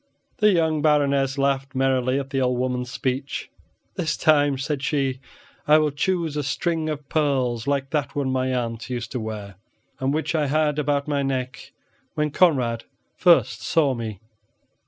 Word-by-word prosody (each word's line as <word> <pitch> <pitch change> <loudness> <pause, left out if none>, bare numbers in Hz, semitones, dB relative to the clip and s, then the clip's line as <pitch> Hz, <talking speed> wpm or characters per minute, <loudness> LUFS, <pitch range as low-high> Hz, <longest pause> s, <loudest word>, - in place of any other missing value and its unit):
The 210 0 +5
young 160 -4 +1
Baroness 140 -2 +2
laughed 135 -1 0
merrily 130 -1 +1
at 135 -1 -6
the 135 -2 0
old 125 -1 +1
woman's 125 -1 -2
speech. 130 +2 -3 0.5
"This 155 -2 -1
time," 145 -3 +3
said 135 +1 -3
she, 135 -2 -1 0.5
"I 150 +1 +7
will 155 -1 +2
choose 165 +1 -1
a 150 - 0
string 155 +3 -1
of 150 -2 -5
pearls 130 -7 0
like 140 -1 -1
that 145 -1 -1
one 140 -2 0
my 130 0 0
aunt 115 -2 -3
used 120 -2 -4
to 125 - -3
wear, 105 -3 -6 0.4
and 130 +1 0
which 155 +3 -1
I 155 -3 +1
had 150 +1 +1
about 145 -1 0
my 145 -1 0
neck 130 -2 -3 0.4
when 150 -1 0
Conrad 125 -10 +2 0.3
first 175 -2 +4
saw 150 -5 +2
me." 110 -5 -5
140 Hz, 165 wpm, -23 LUFS, 130-150 Hz, 0.5 s, I